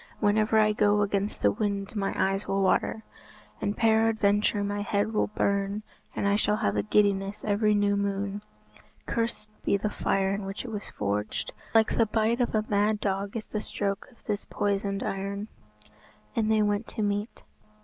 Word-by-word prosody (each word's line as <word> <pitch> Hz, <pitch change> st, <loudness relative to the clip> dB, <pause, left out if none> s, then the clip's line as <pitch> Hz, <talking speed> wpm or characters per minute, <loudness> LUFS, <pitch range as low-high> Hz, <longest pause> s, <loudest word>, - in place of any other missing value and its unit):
Whenever 215 Hz, +1 st, +3 dB
I 215 Hz, -1 st, +5 dB
go 210 Hz, 0 st, +3 dB
against 200 Hz, 0 st, -2 dB
the -, -, +5 dB
wind 200 Hz, -1 st, -2 dB
my 195 Hz, -2 st, 0 dB
eyes 195 Hz, +1 st, 0 dB
will 195 Hz, 0 st, +1 dB
water, 220 Hz, +3 st, +1 dB, 0.6 s
and 205 Hz, -, -1 dB
peradventure 220 Hz, -2 st, +3 dB
my 205 Hz, 0 st, -2 dB
head 205 Hz, +1 st, 0 dB
will 210 Hz, -, +2 dB
burn, 200 Hz, 0 st, 0 dB, 0.3 s
and 200 Hz, -, 0 dB
I 200 Hz, -, +3 dB
shall 210 Hz, 0 st, +2 dB
have 100 Hz, -, 0 dB
a 105 Hz, -, +2 dB
giddiness 200 Hz, -, +1 dB
every 210 Hz, 0 st, +2 dB
new 205 Hz, 0 st, +2 dB
moon. 200 Hz, 0 st, -2 dB, 0.6 s
Cursed 230 Hz, -2 st, -2 dB
be 200 Hz, -, +2 dB
the 210 Hz, +1 st, -2 dB
fire 195 Hz, -1 st, +1 dB
in 200 Hz, 0 st, -3 dB
which 195 Hz, +5 st, -5 dB
it 240 Hz, -, -6 dB
was 210 Hz, -1 st, -5 dB
forged. 105 Hz, +1 st, -2 dB, 0.2 s
Like 220 Hz, -1 st, +4 dB
the 225 Hz, -, +5 dB
bite 225 Hz, +3 st, +1 dB
of 240 Hz, -, 0 dB
a 215 Hz, 0 st, +1 dB
mad 210 Hz, +1 st, +2 dB
dog 200 Hz, +2 st, -2 dB
is 220 Hz, -, -5 dB
the 215 Hz, -, -4 dB
stroke 200 Hz, -1 st, -3 dB
of 240 Hz, -, -24 dB
this 210 Hz, -2 st, -1 dB
poisoned 200 Hz, -1 st, -1 dB
iron." 200 Hz, +2 st, -3 dB, 0.9 s
And 220 Hz, -1 st, +1 dB
they 215 Hz, -1 st, +4 dB
went 205 Hz, +1 st, 0 dB
to 215 Hz, -, -3 dB
meat. 205 Hz, +2 st, -2 dB
205 Hz, 180 wpm, -28 LUFS, 200-215 Hz, 0.9 s, I